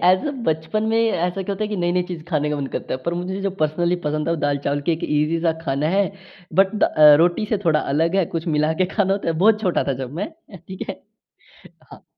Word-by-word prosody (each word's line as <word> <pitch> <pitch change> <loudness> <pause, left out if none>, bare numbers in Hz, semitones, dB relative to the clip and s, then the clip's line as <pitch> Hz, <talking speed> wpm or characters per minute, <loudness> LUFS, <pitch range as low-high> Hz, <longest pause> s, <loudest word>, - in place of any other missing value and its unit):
As 185 +9 +4
a, - - 0 0.2
बचपन 160 +7 -1
में - - +2
ऐसा 180 +2 -1
क्या 200 - -3
होता 215 +2 -2
है - - -3
कि 210 - -3
नई-नई 175 0 +1
चीज़ 165 -3 -5
खाने 150 -3 0
का 150 - -1
मन 140 - -3
करता - - -3
हैं। 130 - -7
पर 170 0 -2
मुझे 185 +2 -4
जो 195 - -1
पर्सनली 170 +3 +1
पसंद 155 +2 -1
था, - - +1
वो 170 - +1
दाल-चावल, 145 -1 -1
कि 165 +4 0
एक 160 - -3
ईज़ी-सा 160 +2 +1
खाना 140 +1 0
है। 200 - +4 0.5
बट 195 +4 +3
दा - - +3
अ, 150 -1 +7
रोटी 175 +6 +2
से 215 - +1
थोड़ा 155 -2 +3
अलग 165 +6 0
है, 190 - +3
कुछ 165 +2 -3
मिला 155 +1 +2
के - - +2
खाना 195 -2 +2
होता 195 -4 -2
है, - - +2
बहुत 215 0 +5
छोटा 180 -3 +1
था - - +2
जब 130 +2 -6
मैं - - -1 0.3
अ, - - -7
ठीक 185 +2 -9
है? - - -6 0.9
हाँ। - - -13
170 Hz, 255 wpm, -21 LUFS, 150-190 Hz, 0.9 s, अ